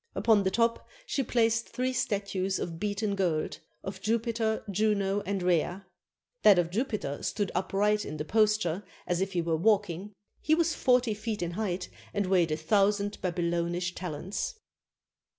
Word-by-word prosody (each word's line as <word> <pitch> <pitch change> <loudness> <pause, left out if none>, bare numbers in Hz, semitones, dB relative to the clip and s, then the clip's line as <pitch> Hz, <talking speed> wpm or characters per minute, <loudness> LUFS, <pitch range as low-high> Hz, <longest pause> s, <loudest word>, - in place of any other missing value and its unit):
Upon 220 -3 +4
the 190 - +1
top 230 +3 +1 0.2
she 285 - -1
placed 230 -2 +1
three 255 +1 -1
statues 200 -4 -1
of 165 -1 -4
beaten 205 0 -1
gold, 175 -6 -1 0.2
of 195 - -6
Jupiter, 225 0 0
Juno, 200 0 +1
and 195 -2 -1
Rhea. 180 +2 +1 0.6
That 205 -3 +7
of 170 -1 +1
Jupiter 210 - -2
stood 205 -3 -1
upright 205 +3 +1
in 155 - -6
the 150 - -3
posture 210 -2 +2 0.2
as 175 0 0
if 195 +1 -1
he 175 -2 0
were 165 -1 +1
walking; 205 0 +1 0.3
he 315 - +3
was 335 0 +2
forty 250 -3 +3
feet 210 -2 -3
in 170 - -2
height 185 -1 -2 0.3
and 200 -1 +1
weighed 180 -4 +3
a 155 - 0
thousand 200 +4 +1
Babylonish 175 0 -1
talents. 180 - -4
200 Hz, 155 wpm, -29 LUFS, 175-215 Hz, 0.6 s, That